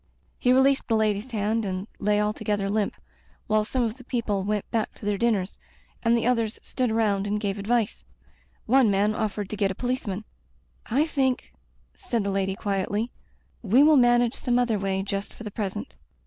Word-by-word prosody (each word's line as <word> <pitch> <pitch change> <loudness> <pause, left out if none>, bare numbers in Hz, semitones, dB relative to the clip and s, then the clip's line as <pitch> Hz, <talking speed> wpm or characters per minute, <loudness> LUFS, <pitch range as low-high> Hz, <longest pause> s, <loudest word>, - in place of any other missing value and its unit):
He 250 - +3
released 265 +1 +4
the 230 - +2
Lady's 215 +1 0
hand 220 0 0
and 190 -1 -3
lay 210 0 +2
alto 210 0 -1
gether 205 -2 0
limp, 210 -1 0 0.5
while 215 0 +2
some 250 +3 -1
of 230 +1 -2
the 255 - -13
people 220 -6 -1
went 210 0 -1
back 225 -2 -1
to - - -11
their 205 0 +1
dinners, 210 -5 0 0.4
and 235 0 +3
the 230 - -1
others 230 -3 +1
stood 255 -2 -1
around 210 -3 +1
and 210 +1 0
gave 200 -1 -2
advice. 220 - 0 0.6
One 255 -1 +5
man 205 +2 +2
offered 210 -2 -2
to - - -2
get 200 -1 +1
a 190 - -4
policeman. 235 -5 -3 0.3
" - - -38
I 275 +7 +2
think," 265 -5 -1 0.4
said 240 - -2
the 200 - -1
lady 195 0 0
quietly, 205 +3 -1 0.3
" - - -39
we 260 +5 +7
will 305 0 +6
manage 240 -2 +4
some 245 -3 0
other 235 -4 +1
way 195 0 -1
just 200 0 -4
for - - -10
the 210 - -6
present. 190 - -4
215 Hz, 195 wpm, -26 LUFS, 200-240 Hz, 0.6 s, we